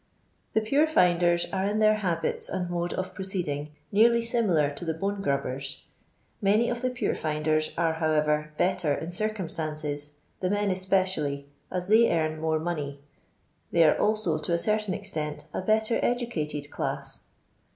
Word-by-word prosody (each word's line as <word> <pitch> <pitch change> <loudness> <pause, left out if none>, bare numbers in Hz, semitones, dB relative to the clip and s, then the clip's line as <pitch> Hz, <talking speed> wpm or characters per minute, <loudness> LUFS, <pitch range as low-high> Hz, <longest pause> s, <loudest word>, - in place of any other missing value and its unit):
The 220 - +3
pure 275 +8 +3
findcn 175 - +3
are 190 0 0
in 205 +1 0
their 215 0 +4
habits 175 -5 -1
and 180 -1 -3
mode 175 0 -1
of 185 - -4
proceeding 175 -7 -2 0.2
nearly 235 +3 +4
similar 195 -11 +2
to 145 - -8
the 160 -2 -2
bone 195 +3 -2
grubbers. 140 -4 -2 0.6
Many 210 +5 +3
of 240 0 -3
the 255 - +1
puretinden 155 -9 0
are, 165 -1 +2
however, 150 -1 +1
better 180 -5 +1
in 165 +4 -5
circumstances, 155 -7 -3 0.3
the 185 - -1
men 205 0 +1
especially, 185 -7 +1 0.2
as 180 -1 -2
they 225 +3 +5
earn 155 -1 -1
more 160 0 +1
money. 150 -4 -3 0.7
They 170 - +4
are 155 - +5
also, 210 -7 +1
to 155 +3 -1
a - - +3
certain 210 0 +1
extent, 155 -7 -4
a - - -2
better 220 +3 +2
educated 155 - -2
class. - - -4
175 Hz, 150 wpm, -27 LUFS, 155-210 Hz, 0.7 s, they